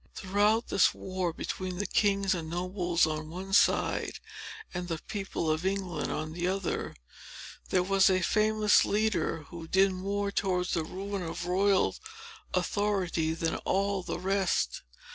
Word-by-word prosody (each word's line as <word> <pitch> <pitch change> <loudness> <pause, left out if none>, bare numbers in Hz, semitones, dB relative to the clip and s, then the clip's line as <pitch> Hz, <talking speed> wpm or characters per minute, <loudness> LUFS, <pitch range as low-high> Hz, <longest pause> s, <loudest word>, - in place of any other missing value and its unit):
Throughout 205 +4 +1
this 185 - +4
war 185 -2 -2
between 185 +2 -4
the 205 - -2
king 200 -2 +2
and 160 -2 -5
nobles 175 0 +1
on 155 0 -3
one 190 +3 -7
side, - - +2 0.5
and 180 0 -4
the 165 -2 -2
people 195 -1 -4
of 155 +2 -1
England 190 -5 -2
on 155 +1 -3
the 175 +1 -2
other, 190 -1 -2 0.7
there 180 - +2
was 195 +1 +4
a 185 -1 +2
famous 215 +1 +4
leader, 210 -6 0
who 165 -1 -8
did 190 +3 +4
more 200 +2 -2
towards 180 -3 0
the 165 - +1
ruin 195 +4 -5
of 170 0 -4
royal 190 +2 +2 0.6
authority, 180 -4 0
than 165 0 -1
all 195 0 0
the 180 - -4
rest. 185 - 0
185 Hz, 145 wpm, -29 LUFS, 175-200 Hz, 0.7 s, this